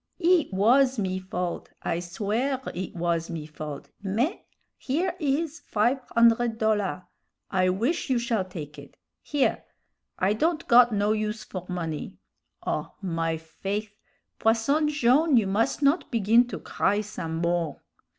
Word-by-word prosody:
"It 350 Hz, -5 st, +3 dB
was 250 Hz, +7 st, +4 dB
me 185 Hz, -3 st, -1 dB
fault! 180 Hz, -2 st, -4 dB
I 165 Hz, -, -1 dB
swear 215 Hz, +9 st, -1 dB
it 180 Hz, +1 st, -5 dB
was 170 Hz, -1 st, -1 dB
me 165 Hz, -3 st, -5 dB
fault! 150 Hz, -2 st, -8 dB
Mais, 220 Hz, -, 0 dB, 0.4 s
here 325 Hz, +8 st, -1 dB
is 305 Hz, +2 st, -1 dB
five 235 Hz, +6 st, +1 dB, 0.2 s
hundred 235 Hz, 0 st, +4 dB
dollar'; 210 Hz, -4 st, 0 dB, 0.5 s
I 185 Hz, -1 st, +3 dB
wish 235 Hz, -, 0 dB
you 260 Hz, -, +3 dB
shall 235 Hz, -4 st, 0 dB
take 160 Hz, -5 st, -8 dB
it. -, -, -14 dB, 0.2 s
Here! 290 Hz, -2 st, 0 dB, 0.5 s
I 190 Hz, +3 st, +2 dB
don't 315 Hz, +8 st, 0 dB
got 240 Hz, 0 st, +7 dB
no 205 Hz, 0 st, +1 dB
use 215 Hz, 0 st, -2 dB
for 185 Hz, -3 st, -7 dB
money. 165 Hz, -4 st, -4 dB, 0.5 s
Oh 150 Hz, -, -3 dB
my 165 Hz, -3 st, -1 dB
faith! 200 Hz, +6 st, -5 dB, 0.4 s
Posson 235 Hz, +8 st, +2 dB
Jone', 295 Hz, +1 st, +4 dB
you 220 Hz, -, +3 dB
must 220 Hz, +9 st, 0 dB
not 280 Hz, +5 st, +3 dB
begin 230 Hz, +1 st, +4 dB
to -, -, -5 dB
cry 205 Hz, +2 st, 0 dB
some 175 Hz, -6 st, -5 dB
more." 170 Hz, -1 st, -1 dB
210 Hz, 140 wpm, -26 LUFS, 180-250 Hz, 0.5 s, got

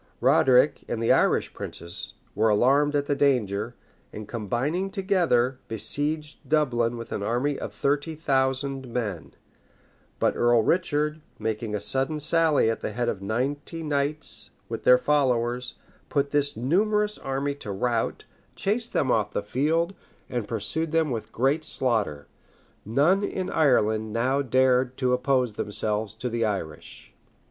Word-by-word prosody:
Roderic, 130 Hz, +2 st, +4 dB
and 115 Hz, -, -2 dB
the 115 Hz, -, +2 dB
other -, -, +6 dB
Irish -, -, +1 dB
princes, 85 Hz, +1 st, -7 dB, 0.2 s
were 110 Hz, +2 st, +2 dB
alarmed 140 Hz, +7 st, +3 dB
at 145 Hz, -1 st, +1 dB
the 145 Hz, -, 0 dB
danger; 120 Hz, -5 st, +1 dB, 0.4 s
and 105 Hz, -1 st, -8 dB
combining 125 Hz, -, -2 dB
together, 170 Hz, -, +1 dB
besieged 145 Hz, +8 st, -3 dB
Dublin 120 Hz, -6 st, +1 dB
with 115 Hz, -, -8 dB
an -, -, -3 dB
army 125 Hz, +7 st, -1 dB
of -, -, -5 dB
thirty 145 Hz, +3 st, -1 dB
thousand 135 Hz, -2 st, 0 dB
men; 105 Hz, -9 st, -4 dB, 0.8 s
but -, -, +1 dB
Earl 120 Hz, -1 st, +3 dB
Richard, 150 Hz, -1 st, 0 dB, 0.2 s
making 110 Hz, 0 st, -3 dB
a -, -, -1 dB
sudden 135 Hz, +8 st, 0 dB
sally 155 Hz, -3 st, +3 dB
at 115 Hz, -, 0 dB
the 105 Hz, -, -4 dB
head 120 Hz, +2 st, -1 dB
of 100 Hz, -, -4 dB
ninety 140 Hz, -, -3 dB
knights 145 Hz, 0 st, -1 dB, 0.2 s
with -, -, -6 dB
their 125 Hz, -, +8 dB
followers, 125 Hz, -3 st, 0 dB, 0.3 s
put 140 Hz, -1 st, 0 dB
this 145 Hz, -4 st, +1 dB
numerous 210 Hz, -, +1 dB
army 135 Hz, +1 st, -2 dB
to 140 Hz, -7 st, -7 dB
rout, 115 Hz, +4 st, -1 dB, 0.3 s
chased 225 Hz, +4 st, -1 dB
them 130 Hz, -, +1 dB
off 105 Hz, -2 st, +1 dB
the -, -, -1 dB
field, 160 Hz, -, 0 dB, 0.4 s
and 120 Hz, -4 st, -2 dB
pursued 120 Hz, +9 st, -2 dB
them 160 Hz, -3 st, +1 dB
with 115 Hz, -3 st, -4 dB
great 135 Hz, +6 st, +1 dB
slaughter. 110 Hz, -, -1 dB, 0.6 s
None 145 Hz, -, +3 dB
in 190 Hz, -2 st, -3 dB
Ireland 110 Hz, -7 st, +2 dB
now 130 Hz, +5 st, +1 dB
dared 130 Hz, 0 st, +2 dB
to 125 Hz, -2 st, +1 dB
oppose 125 Hz, -2 st, +1 dB
themselves 105 Hz, +1 st, 0 dB
to 120 Hz, +3 st, -4 dB
the 120 Hz, -1 st, -2 dB
English. 95 Hz, -8 st, -5 dB
130 Hz, 145 wpm, -26 LUFS, 115-150 Hz, 0.8 s, their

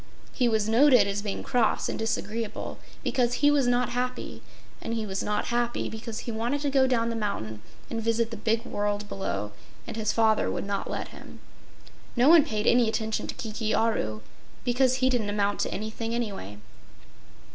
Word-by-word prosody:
He 245 Hz, -2 st, +2 dB
was 220 Hz, -2 st, +1 dB
noted 250 Hz, +3 st, +6 dB
as 200 Hz, 0 st, -1 dB
being 205 Hz, -1 st, -4 dB
cross 245 Hz, -2 st, +1 dB
and -, -, -3 dB
disagreeable 225 Hz, 0 st, -3 dB, 0.2 s
because 245 Hz, -1 st, +1 dB
he 290 Hz, +3 st, +4 dB
was 280 Hz, -4 st, +3 dB
not 245 Hz, 0 st, +2 dB
happy, 250 Hz, +1 st, -3 dB, 0.4 s
and 230 Hz, -, -3 dB
he 220 Hz, -1 st, -2 dB
was 190 Hz, -2 st, -2 dB
not 210 Hz, 0 st, -1 dB
happy 240 Hz, 0 st, 0 dB
because 220 Hz, 0 st, -6 dB
he 235 Hz, -, -5 dB
wanted 235 Hz, +6 st, -1 dB
to 285 Hz, -1 st, 0 dB
go 265 Hz, -1 st, +4 dB
down 230 Hz, -2 st, +1 dB
the -, -, -3 dB
mountain 110 Hz, -, -3 dB, 0.3 s
and 225 Hz, -, -3 dB
visit 230 Hz, +1 st, +1 dB
the -, -, -4 dB
big 225 Hz, +1 st, 0 dB
world 205 Hz, 0 st, -2 dB
below 190 Hz, -, -3 dB, 0.3 s
and -, -, -6 dB
his 215 Hz, -2 st, 0 dB
father 220 Hz, -1 st, +3 dB
would -, -, -3 dB
not 200 Hz, 0 st, -2 dB
let -, -, -4 dB
him. -, -, -12 dB, 0.8 s
No 250 Hz, +4 st, +5 dB
one 330 Hz, -2 st, +8 dB
paid 215 Hz, -7 st, -2 dB
any 240 Hz, -2 st, +5 dB
attention 220 Hz, -1 st, -2 dB
to -, -, -5 dB
Kiki 220 Hz, 0 st, -2 dB
Aru, 110 Hz, -, 0 dB, 0.4 s
because 255 Hz, +1 st, +3 dB
he 260 Hz, 0 st, +2 dB
didn't 225 Hz, -5 st, 0 dB
amount 205 Hz, 0 st, 0 dB
to -, -, 0 dB
anything, 220 Hz, +2 st, -3 dB
anyway. 195 Hz, -, -4 dB
225 Hz, 185 wpm, -27 LUFS, 210-245 Hz, 0.8 s, one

